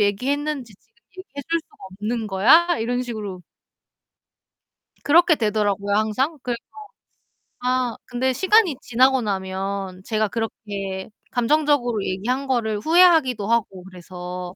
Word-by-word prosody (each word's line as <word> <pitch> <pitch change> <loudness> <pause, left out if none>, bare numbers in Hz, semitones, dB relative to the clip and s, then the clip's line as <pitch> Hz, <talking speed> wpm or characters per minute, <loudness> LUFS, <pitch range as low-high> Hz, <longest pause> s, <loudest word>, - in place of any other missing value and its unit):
얘기했는지 260 +5 -1
지금 225 - -39 0.2
얘기해 280 -7 -8
줄 335 - +2
수가 - - -27 0.2
없는 220 +1 -3
거야?" 270 - +4
이런 245 +2 -1
식으로. 210 -7 -6 1.6
그렇게 330 +2 +5
되더라고요 205 -3 0
항상. 255 +9 0
그래서 240 -2 -2 1.0
아 250 -1 0
근데 255 +1 -1
시간이 380 - +3
지나고 260 +2 +3
나면 190 -1 -4
제가 215 -2 0
그렇게 200 -3 -5 0.2
감정적으로 245 -3 +1
얘기한 250 +9 -2
거를 220 -5 0
후회하기도 315 - +4
하고 215 -5 -1
그래서 180 0 -8
230 Hz, 295 characters per minute, -22 LUFS, 200-265 Hz, 1.6 s, 그렇게